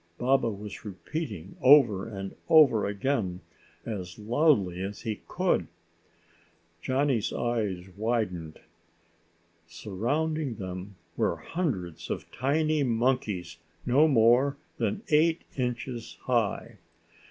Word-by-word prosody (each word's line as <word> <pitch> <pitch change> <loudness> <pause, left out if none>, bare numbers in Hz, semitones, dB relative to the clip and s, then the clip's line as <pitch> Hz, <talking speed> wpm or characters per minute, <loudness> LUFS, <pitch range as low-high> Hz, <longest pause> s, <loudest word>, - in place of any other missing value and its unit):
Baba 130 -1 +2
was 105 -1 -7
repeating 100 - -6
over 125 -8 +6
and 95 -3 -6
over 140 -11 +6
again 100 -3 -1 0.4
as 90 -6 -5
loudly 105 - +2
as 100 +2 -5
he 110 -4 -4
could. - - 0 1.1
Johnny's 130 -4 +1
eyes 105 -7 -2
widened. 100 -8 -2 1.1
Surrounding 125 - -2
them 95 0 -7 0.2
were - - +1
hundreds 90 - -4
of - - -5
tiny 155 +3 +1
monkeys 115 - 0 0.3
no 140 +6 +5
more 130 +2 +4 0.2
than 215 +1 -1
eight 160 +2 +3
inches 125 -2 -4
high. 115 -2 -1
115 Hz, 95 wpm, -28 LUFS, 95-135 Hz, 1.1 s, over